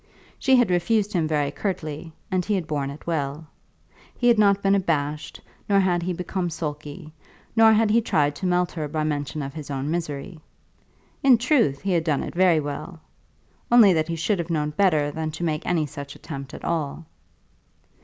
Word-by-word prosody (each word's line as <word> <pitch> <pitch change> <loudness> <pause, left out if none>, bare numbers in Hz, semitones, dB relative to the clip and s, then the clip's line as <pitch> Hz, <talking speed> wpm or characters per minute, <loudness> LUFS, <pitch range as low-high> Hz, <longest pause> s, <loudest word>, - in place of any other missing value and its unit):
She 265 - +4
had 245 -6 +3
refused 205 +4 +1
him 165 -4 +1
very 145 -2 0
curtly, 160 -3 -4 0.2
and 185 -1 +1
he 210 +3 0
had 185 -4 -2
borne 145 -3 -2
it 140 +2 -10
well. 150 -2 -2 0.7
He 245 - +1
had 235 -2 +4
not 200 -1 +4
been 195 0 +3
abashed, 150 -5 -1 0.3
nor 200 -1 +4
had 180 -2 +2
he 180 +2 -2
become 180 +1 -3
sulky, 150 -1 -6 0.4
nor 225 -1 +7
had 220 0 +3
he 230 +2 +4
tried 145 -9 +1
to 185 - -2
melt 180 0 +1
her 155 -3 -4
by 155 +1 -2
mention 150 0 -2
of 135 0 -6
his 155 -3 -8
own 140 +1 -3
misery. 165 0 -4 0.8
In 265 -3 +6
truth 235 - +2
he 195 - -1
had 170 -3 +2
done 155 -4 0
it - - -6
very 180 -2 +4
well, 150 +3 -6 0.7
only 225 -6 +7
that 160 -1 0
he 170 - -2
should 180 +4 0
have 170 0 -3
known 150 -2 -1
better 155 -4 +2
than 160 +1 -3
to 160 +3 -6
make 155 -2 -1
any 165 -3 +1
such 140 0 -8
attempt 140 -2 -8
at - - -9
all. 160 -1 -2
165 Hz, 195 wpm, -24 LUFS, 150-190 Hz, 0.8 s, nor